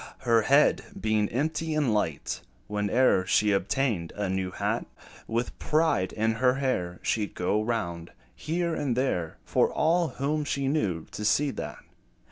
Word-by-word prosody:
Her 115 -1 +4
head 140 +7 +4 0.2
being 110 - +1
empty 155 +4 -1
and 145 -7 +2
light, 80 -8 -1 0.3
Whene'er 105 0 +2
she 105 +1 +3
obtained 100 -2 0
a 105 -2 -2
new 95 0 -1
hat, - - -2 0.4
With 120 +2 -2
pride 155 - +1
in 110 +1 +1
her 130 0 +4
air, 90 -11 -1
She 105 -2 0
'd - - -22
go 105 +4 +1
round, 85 -7 -3 0.2
here 170 +1 -1
and 135 -6 -1
there, 90 -11 -1
For - - +2
all 170 +2 +2
whom 150 +2 -1
she 140 -1 -1
knew 100 - 0
to 105 - -6
see 140 +7 +2
that. - - -7
115 Hz, 155 wpm, -27 LUFS, 100-140 Hz, 0.4 s, Her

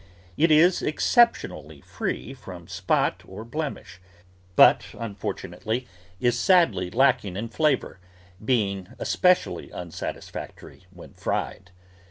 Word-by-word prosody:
It 165 - +3
is 165 +4 +5
exceptionally 155 - +1
free 130 - -4
from 95 -9 -11
spot - - 0
or 105 +4 -9
blemish, 140 - -6 0.5
but, - - +6
unfortunately, 110 +2 -4 0.3
is 120 +1 +1
sadly 170 - +3
lack 130 +4 +3
ing 95 -2 -6
in 115 +3 -4
flavour, 140 - 0 0.4
being 100 -6 -1
especially 180 0 +1
unsatisfactory 90 +1 -8
when 90 -2 -14
fried. - - -3
115 Hz, 105 wpm, -25 LUFS, 95-150 Hz, 0.5 s, but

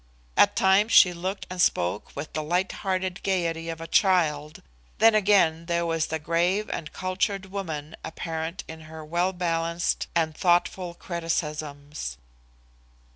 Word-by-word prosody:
At - - +5
times 195 +4 +4
she 180 -2 +7
looked 185 +3 -4
and 185 -1 -3
spoke 90 - 0
with 145 +2 -6
the 155 - -1
light 180 +5 0
hearted 185 -1 -2
gaiety 165 -3 -1
of 165 -1 -5
a 165 - -6
child; 155 -6 +1 0.3
then 225 0 +6
again 190 -6 +3
there 170 -1 0
was 165 -1 0
the 160 - -2
grave 170 +6 0
and 155 - -5
cultured 190 +1 -2
woman 160 -6 -5
apparent 165 +1 -4
in 160 0 -9
her 160 -1 -9
well 175 +4 0
balanced 170 -1 -1
and 160 -2 +1
thoughtful 175 0 +1
criticisms. 150 - -4
170 Hz, 140 wpm, -26 LUFS, 160-185 Hz, 0.3 s, she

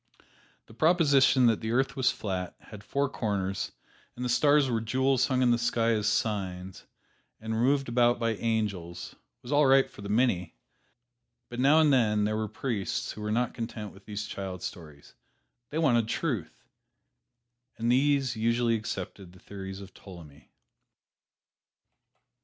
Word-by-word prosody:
The - - -16
proposition 140 -3 +4
that 115 -2 +3
the 110 - -3
earth 135 +2 +1
was 130 -2 +2
flat, 90 -3 -4
had 105 -2 -12
four 140 +5 0
corners, 100 -7 -2 0.4
and 125 - -4
the - - -1
stars 145 +4 +4
were 115 -3 -1
jewels 130 +3 +1
hung 130 -1 +1
in 120 - +4
the 120 - +2
sky 115 -1 +1
as 105 -2 0
"signs," 95 -4 -2 0.5
and 110 0 -4
were 110 - -1
moved 135 +2 +2
about 120 0 +3
by 115 -1 0
angels, 100 -7 -3 0.3
was 120 - -8
all 145 -1 +4
right 135 0 +5
for - - -14
the 100 - -7
many, 100 - +1 0.9
but 120 - -7
now 140 +5 +5
and 150 -3 +4
then 105 -5 +3
there 105 +1 0
were 110 0 -2
priests 105 - -3
who 105 - -9
were 105 0 -3
not 120 +3 0
content 115 -3 -6
with - - -17
these 105 0 -5
child 95 -2 -6
stories 75 -6 -9 0.6
they 150 - -4
wanted 120 -8 +3
truth 120 - -3 1.1
and 115 +1 0
these 135 -1 +2
usually 115 +1 +1
accepted 95 -4 -5
the 95 - -17
theories 95 -1 -8
of 95 -1 -12
Ptolemy. 80 -6 -14
115 Hz, 160 wpm, -28 LUFS, 100-130 Hz, 1.1 s, right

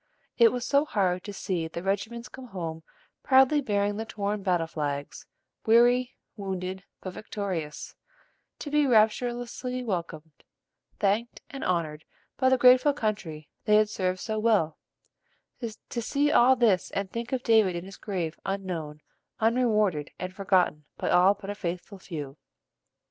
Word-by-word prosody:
It 230 -1 +7
was 245 -1 -3
so 280 +1 +3
hard 185 -10 0
to 205 - -5
see 180 -4 -3
the 170 +2 -7
regiments 220 +5 -2
come 260 -1 -11
home 165 -6 -5 0.4
proudly 265 +2 +5
bearing 205 -4 0
the 220 - -2
torn 205 -1 -3
battle 180 -4 +1
flags, 145 -3 -4 0.4
weary, 245 +3 +4 0.2
wounded, 190 -2 -4 0.2
but 185 - -6
victorious, 185 -8 -5 0.6
to 290 - -7
be 295 -1 +3
rapturously 245 +2 +1
welcomed, 165 - -5 0.6
thanked, 210 +4 0
and 275 - -6
honored 165 -4 -1 0.3
by 260 -1 +3
the 260 - +4
grateful 255 +3 +6
country 195 - -3 0.2
they 210 - +4
had 215 0 +4
served 185 -2 -1
so 220 -1 -2
well; 210 -9 +2 0.8
to 235 0 -6
see 285 +5 +1
all 255 +2 +6
this 215 -8 +2
and 200 -1 -3
think 235 +2 -5
of 260 -1 -1
David 220 -6 +4
in 170 +1 -5
his 195 0 -11
grave 175 -6 -4
unknown, 175 -6 -4 0.4
unrewarded, 215 -9 +2
and 185 0 -5
forgotten 185 -6 +1
by - - -1
all 185 +3 +5
but 200 0 -7
a - - -3
faithful 185 0 -5
few. 150 -6 -7
200 Hz, 150 wpm, -27 LUFS, 180-235 Hz, 0.8 s, It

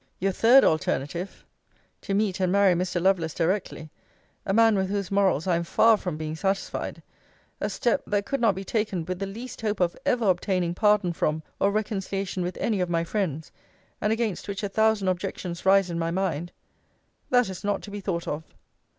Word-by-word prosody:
Your 195 +2 0
third 240 +7 +6
alternative, 170 +1 -1 0.6
to 195 - -2
meet 200 -3 0
and 185 -1 +1
marry 200 -1 +5
Mr. 175 0 -1
Lovelace 175 -4 +1
directly; 170 -3 -2 0.6
a - - +1
man 225 +1 +5
with 190 -1 0
whose 200 -2 -2
morals 195 -6 +2
I 180 -2 +2
am 170 - 0
far 225 +6 +4
from 180 -6 -4
being 155 0 -4
satisfied 195 +3 -3 0.6
a - - -1
step, 260 +3 0
that 205 -1 0
could 275 +2 -2
not 225 -4 +3
be 195 - -5
taken 200 -5 -2
with 185 +1 -4
the 195 - -2
least 230 +6 -8
hope 215 -2 -1
of 175 -2 +1
ever 240 -4 +1
obtaining 180 -1 +1
pardon 210 -2 +2
from 155 -1 -1 0.2
or 200 - +3
reconciliation 195 -3 -2
with 180 +1 -3
any 215 -4 0
of 180 -1 0
my 165 -1 +1
friends; 170 -5 -3 0.5
and 210 - +1
against 220 -5 -1
which 200 0 -4
a 205 - -1
thousand 220 -1 +2
objections 185 -1 -3
rise 195 -2 +5
in 170 - -3
my 165 0 -1
mind 175 -2 -2 0.8
that 245 -1 +4
is 190 -2 -7
not 205 -1 -1
to 205 - -9
be 205 - -5
thought 175 -3 -3
of. 150 - -2
195 Hz, 195 wpm, -26 LUFS, 175-205 Hz, 0.8 s, third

